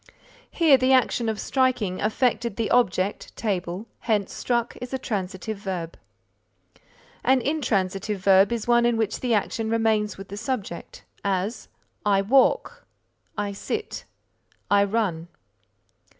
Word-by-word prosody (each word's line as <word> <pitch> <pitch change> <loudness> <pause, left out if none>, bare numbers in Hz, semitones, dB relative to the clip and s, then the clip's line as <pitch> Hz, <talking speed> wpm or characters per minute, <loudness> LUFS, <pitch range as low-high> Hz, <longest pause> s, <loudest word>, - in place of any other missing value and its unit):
Here 315 -5 +5
the 260 +1 +3
action 240 -2 +2
of 215 -1 -3
striking 250 -8 0
affected 235 0 0
the 225 0 -2
object 200 -5 +1
table, 190 -2 -2
hence 210 -4 0
struck 240 -1 -1
is 250 +1 -4
a - - 0
transitive 200 -3 -4
verb. 180 -5 -4 1.3
An 265 0 +4
intransitive 210 -8 -1
verb 195 +2 +5
is 235 -1 -2
one 240 0 +4
in 235 -1 +1
which 220 -2 -1
the 245 -3 +1
action 220 +2 -1
remains 220 -2 +1
with 195 0 -10
the 200 - -7
subject; 215 -7 -5 0.2
as 200 +3 -2 0.4
"I 195 -1 +3
walk," 260 +6 +2 0.5
"I 205 0 -1
sit," 425 - -5 0.7
_"I 200 0 +5
run." 195 -6 -1
215 Hz, 130 wpm, -25 LUFS, 195-240 Hz, 1.3 s, Here